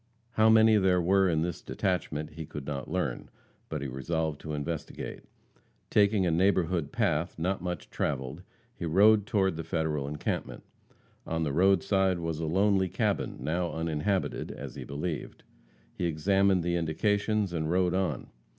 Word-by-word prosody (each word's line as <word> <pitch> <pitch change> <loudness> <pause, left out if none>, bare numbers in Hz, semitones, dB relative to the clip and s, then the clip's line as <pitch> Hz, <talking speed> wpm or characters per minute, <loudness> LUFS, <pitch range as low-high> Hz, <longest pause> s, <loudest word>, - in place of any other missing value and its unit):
How 110 -1 +4
many 110 0 +6
there 95 -2 +3
were 95 +2 +3
in 80 -1 +1
this 85 -2 -3
detachment 85 -5 -2
he 80 -2 -8
could 75 -2 -7
not 70 -3 -4
learn. 80 -8 -2 0.4
But 75 -3 -3
he - - -2
resolved 75 +3 -2
to 75 -1 -4
investigate. 75 +1 -5 0.7
Taking 100 -2 +4
a 85 - +2
neighborhood 85 -3 +1
path, 80 +4 0
not 90 +3 -1
much 90 0 -5
traveled, 70 +2 -2 0.3
he - - -8
rode 105 +5 +5
toward 95 -8 +1
the 80 - -4
Federal 80 -4 -1
encampment. 75 +1 -4 0.6
On 80 0 -1
the 75 -3 -1
roadside 95 +2 +3
was 85 -2 -3
a 80 - -2
lonely 95 +2 +2
cabin, - - -1
now 85 +5 -1
uninhabited, 80 +4 -1
as - - -7
he - - -7
believed. 75 +3 -5 0.5
He 90 - -3
examined 95 +3 +2
the 85 0 0
indications, 100 +4 0
and 80 -2 -1
rode 90 0 +2
on. 95 -8 -2
85 Hz, 155 wpm, -29 LUFS, 80-95 Hz, 0.7 s, many